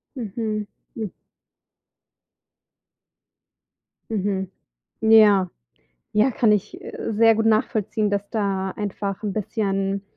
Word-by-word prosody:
Mhm. 215 -2 -3 0.3
Hm. 220 -4 -4 3.0
Mhm. 195 -3 -1 0.5
Ja. 210 -4 +6 0.6
Ja, 215 +5 +4
kann 225 -2 +3
ich, 205 -2 -2
äh, - - -5
sehr 225 +1 +5
gut 225 +1 0
nachvollziehen, 215 -1 +1
dass 200 0 -2
da 195 -3 -1
einfach 200 -1 -4
'n 210 -2 -2
bisschen 195 -2 -1
210 Hz, 95 wpm, -23 LUFS, 195-220 Hz, 3.0 s, Ja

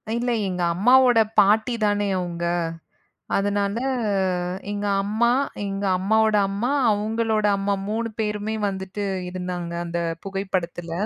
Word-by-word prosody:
இல்ல, 240 +1 0 0.2
எங்க 180 -1 -3
அம்மாவோட 245 +5 +5 0.2
பாட்டிதானே 210 -1 +2
அவுங்க. 170 -1 -3 0.9
அதனால 200 +1 0 0.9
எங்க 205 0 -3 0.2
அம்மா, 220 +4 +1 0.4
எங்க 195 0 -3
அம்மாவோட 220 +3 +2
அம்மா, 205 +5 -1 0.2
அவுங்களோட 215 +1 0
அம்மா 200 +1 0
3 225 +2 -2
பேருமே 210 0 -2
வந்துட்டு 190 +1 -4 0.3
இருந்தாங்க 180 -1 -5
அந்தப் 170 -1 -3
புகைப்படத்துல. 190 -3 -3
205 Hz, 105 wpm, -23 LUFS, 185-220 Hz, 0.9 s, அம்மாவோட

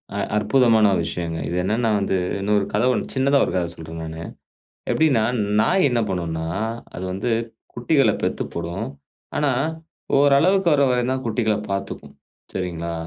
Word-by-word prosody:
அ - - -2 0.2
அற்புதமான 110 0 +4
ஒரு 90 - +1
விஷயங்க. 85 -1 -4
இது 85 - -3
என்னன்னா 110 +4 +1
வந்து 100 -1 0 0.2
இன்னொரு 100 0 +1
கதை - - +2
ஒண்ணு - - -3
சின்னதா 140 +1 +3
ஒரு - - -3
கதை 90 -2 0
சொல்றேன் 80 0 -8
நானு. 80 0 -6 0.7
எப்படின்னா, 140 -8 +3 0.4
நாய் 185 - +3
என்ன 120 -2 +1
பண்ணும்னா, 85 -3 -2 0.5
அது 90 - -5
வந்து 100 +6 -2 0.4
குட்டிகள 135 +4 +3
பெத்து - - -1
போடும். 85 +6 -4 0.5
ஆனா, 145 -1 +2 0.7
ஓரளவுக்கு 160 +7 +4
வர 140 -1 +3
வரைத்தான் 125 +1 0
குட்டிகள 110 -1 +1
பார்த்துக்கும், 100 0 -5 0.4
சரிங்களா? 85 -2 -3
110 Hz, 140 wpm, -22 LUFS, 90-130 Hz, 0.7 s, அற்புதமான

